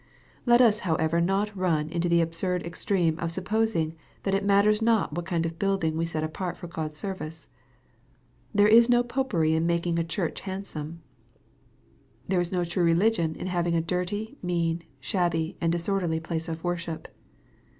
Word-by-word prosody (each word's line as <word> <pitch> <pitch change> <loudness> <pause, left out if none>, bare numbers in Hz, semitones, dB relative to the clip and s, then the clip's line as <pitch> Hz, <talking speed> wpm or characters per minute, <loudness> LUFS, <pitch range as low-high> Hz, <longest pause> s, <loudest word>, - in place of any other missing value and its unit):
Let 240 +1 +6
us 220 -4 +5
however 165 -2 +1
not 195 +4 0
run 165 -5 +1
into 175 0 0
the 170 0 +4
absurd 170 +2 -1
extreme 170 -1 0
of 170 -1 -2
supposing 190 -3 0 0.3
that 195 - 0
it 195 0 +1
matters 205 +2 +4
not 225 -8 +2
what 175 +2 -4
kind 170 -3 0
of 165 0 -5
building 195 -5 +1
we 165 +1 0
set 160 -2 -2
apart 175 +3 -4
for - - -8
God's 155 -3 -5
service. 165 -4 -5 1.0
There 205 -1 +5
is 230 +2 +7
no 240 0 +5
Popery 235 -11 0
in 160 +1 +1
making 170 0 +1
a - - +1
church 165 +1 -3
handsome. 170 -5 -6 1.2
There 185 -1 +2
is 175 - -2
no 180 -2 +1
true 175 +1 -1
religion 170 -1 +2
in - - -6
having 175 -2 0
a - - +3
dirty, 185 - -3
mean, 170 -2 0 0.2
shabby, 165 +2 0
and 165 -1 +2
disorderly 170 -1 0
place 160 0 -4
of 160 0 -5
worship. 170 -2 -3
175 Hz, 170 wpm, -27 LUFS, 165-195 Hz, 1.2 s, is